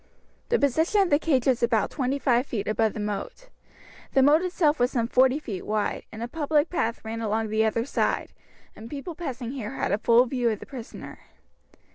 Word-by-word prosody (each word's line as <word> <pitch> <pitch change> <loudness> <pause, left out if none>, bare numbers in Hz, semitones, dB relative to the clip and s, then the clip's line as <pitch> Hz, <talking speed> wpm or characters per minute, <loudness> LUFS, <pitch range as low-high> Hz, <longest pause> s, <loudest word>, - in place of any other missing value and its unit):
The 475 - +3
position 320 - +2
of 380 - +2
the 290 - +5
cage 270 -7 +1
was 260 -3 +2
about 230 -3 +1
twenty 270 -1 -1
five 255 -1 +1
feet 210 -4 -3
above 215 0 +1
the - - -6
moat. - - -5 0.6
The 270 - +5
moat 295 +4 +5
itself 340 -5 +1
was 245 0 +3
some 235 -4 -1
forty 255 +2 +4
feet 215 -11 -6
wide, 215 0 -2
and 220 +1 -6
a - - -3
public 300 +2 0
path 230 -10 -2
ran 225 +1 -4
along 220 0 -1
the 220 +1 +2
other 225 +2 0
side, - - -1 0.4
and 225 +1 -10
people 295 +4 -6
passing 260 -8 -5
here 245 -6 -5
had - - -1
a 200 - +1
full 235 +3 +5
view 245 -1 0
of 215 - -2
the - - -9
prisoner. 250 -5 -9
250 Hz, 205 wpm, -26 LUFS, 225-290 Hz, 0.6 s, the